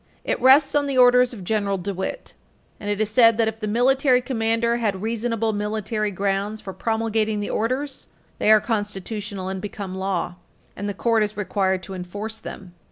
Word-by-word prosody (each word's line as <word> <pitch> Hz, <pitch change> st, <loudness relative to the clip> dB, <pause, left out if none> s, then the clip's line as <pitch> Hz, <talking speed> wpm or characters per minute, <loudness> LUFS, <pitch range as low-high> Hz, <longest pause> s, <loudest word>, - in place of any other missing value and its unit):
It -, -, -2 dB
rests 270 Hz, +3 st, +6 dB
on 290 Hz, -1 st, +2 dB
the 275 Hz, -2 st, -1 dB
orders 250 Hz, 0 st, +6 dB
of 215 Hz, -6 st, -8 dB
General 200 Hz, 0 st, 0 dB
DeWitt. 190 Hz, -, -5 dB, 0.5 s
And 205 Hz, -, -5 dB
it 205 Hz, 0 st, -1 dB
is 215 Hz, -1 st, 0 dB
said 230 Hz, -1 st, +6 dB
that, 225 Hz, -1 st, +2 dB
if 220 Hz, 0 st, -3 dB
the 215 Hz, -, -3 dB
military 255 Hz, +3 st, +3 dB
commander 235 Hz, -2 st, 0 dB
had 205 Hz, -4 st, -1 dB
reasonable 225 Hz, 0 st, -1 dB
military 210 Hz, +1 st, -2 dB
grounds 200 Hz, +2 st, -1 dB
for 190 Hz, -, -7 dB
promulgating 220 Hz, -1 st, -1 dB
the 205 Hz, -, -3 dB
orders, 260 Hz, +5 st, -2 dB, 0.3 s
they -, -, +2 dB
are 215 Hz, 0 st, +8 dB
constitutional, 205 Hz, -2 st, -4 dB
and 190 Hz, 0 st, -4 dB
become 200 Hz, -2 st, -6 dB
law, 190 Hz, -2 st, -2 dB, 0.4 s
and 205 Hz, +1 st, -4 dB
the 200 Hz, -, -4 dB
Court 230 Hz, -2 st, +2 dB
is 210 Hz, 0 st, -1 dB
required 190 Hz, -2 st, 0 dB
to 190 Hz, -, -8 dB
enforce 205 Hz, +5 st, -6 dB
them. 185 Hz, -3 st, -9 dB
215 Hz, 180 wpm, -23 LUFS, 200-230 Hz, 0.5 s, are